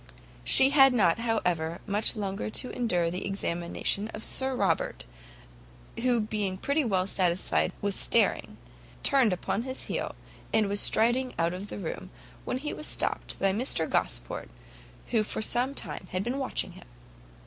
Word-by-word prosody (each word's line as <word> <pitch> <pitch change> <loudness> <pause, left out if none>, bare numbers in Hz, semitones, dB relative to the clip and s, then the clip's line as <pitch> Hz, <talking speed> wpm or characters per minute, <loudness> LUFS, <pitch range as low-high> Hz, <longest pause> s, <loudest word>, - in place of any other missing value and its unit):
She 265 +1 +9
had 270 -3 +6
not, 190 -4 +3
however, 180 -8 -1
much 210 +2 +1
longer 200 -1 -3
to 250 +4 -1
endure 180 -9 0
the 180 - -4
examination 195 +1 -2
of 215 - -7
Sir 265 0 +1
Robert, 190 -8 0 1.0
who 245 -1 +2
being 210 -3 -2
pretty 280 +9 0
well 190 -6 +1
satisfied 175 - +1
with 200 -1 -1
staring, - - +1 0.5
turned 265 -7 +4
upon 180 +4 -2
his 260 +2 -5
heel, - - -4 0.4
and 220 -2 +2
was 200 +1 +1
striding 245 +5 +2
out 165 +1 0
of 190 +3 -6
the - - -7
room, 185 -5 -6 0.4
when - - -2
he 295 +3 -4
was 305 - -5
stopt - - -1
by 195 -1 +1
Mr 245 +7 -1
Gosport, - - -2 0.6
who 230 -3 +2
for 215 - -4
some 250 +5 +1
time 185 - -5
had 185 +1 -1
been 250 +5 -2
watching 265 - -2
him. - - -15
210 Hz, 160 wpm, -28 LUFS, 185-250 Hz, 1.0 s, She